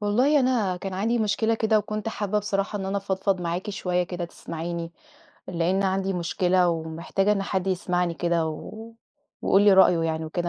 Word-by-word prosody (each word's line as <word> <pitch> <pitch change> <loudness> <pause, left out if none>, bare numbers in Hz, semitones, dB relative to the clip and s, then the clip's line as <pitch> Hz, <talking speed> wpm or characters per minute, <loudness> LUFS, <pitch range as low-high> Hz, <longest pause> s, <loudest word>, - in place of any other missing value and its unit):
والله 250 +8 +3
أنا 230 -8 +1
كان 190 +1 -5
عندي 225 +5 0
مشكلة 220 +1 +1
كده، 220 -1 +2
وكنت 215 +1 -3
حابّة 210 -1 -1
بصراحة 205 0 -2
إن 195 - -4
أنا 195 - -1
أفضفض 190 -1 -1
معاكِ 175 +4 -3
شويّة 180 -3 -1
كده 175 0 -4
تسمعيني، 170 0 -6 0.6
لأن 180 +2 0
عندي 195 0 0
مشكلة 180 +1 +1
ومحتاجة 165 +5 -1
إن 200 -1 0
حد 190 -1 -2
يسمعني 180 -2 0
كده، 170 -1 0
و 220 +8 -8 0.5
ويقول 195 - +4
لي 205 -1 +6
رأيه 190 -2 +6
يعني 160 -1 -1
وكده، 175 +2 -3
190 Hz, 170 wpm, -25 LUFS, 175-205 Hz, 0.6 s, لي